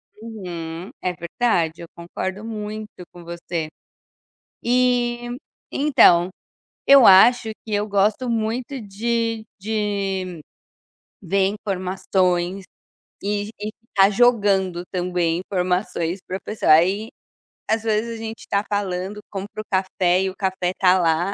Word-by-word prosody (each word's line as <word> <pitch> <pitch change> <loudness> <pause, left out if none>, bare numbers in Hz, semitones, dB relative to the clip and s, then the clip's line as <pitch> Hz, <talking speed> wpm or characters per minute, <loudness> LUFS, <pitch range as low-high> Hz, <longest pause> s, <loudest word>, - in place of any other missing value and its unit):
Uhum, 180 -5 -7
é 180 - -1
verdade 170 -2 -1
eu 170 - -8
concordo 185 +4 -5
muito 215 -1 -6 0.2
com 175 -1 -13
você. 170 -1 -4 1.0
E 240 -1 +1 0.4
então, 185 - +5 0.6
eu 275 -3 +8
acho 225 +4 +7
que 215 - -3
eu 205 +1 0
gosto 205 +5 +1
muito 235 +4 -2
de 225 +2 -2
de 195 -4 -2 0.8
ver 195 0 +1
informações 185 -2 -1 0.6
e 205 +1 -1
e 210 +1 -3 0.2
ficar 195 -3 +4
jogando 200 -6 +2
também 175 -2 0
informações 180 -1 -1
pra 185 - -4
pessoa. 210 -7 +2
Aí 190 +7 +3 0.6
às 220 0 +1
vezes 225 +1 -1
a - - -8
gente 225 0 -7
tá 200 0 +1
falando, 200 0 -2
compra 200 +2 -6
o - - -13
café 185 -1 +1
e 190 - 0
o 190 - -10
café 190 -2 -1
tá 185 0 +4
lá, 170 +3 +1
195 Hz, 120 wpm, -22 LUFS, 180-220 Hz, 1.0 s, eu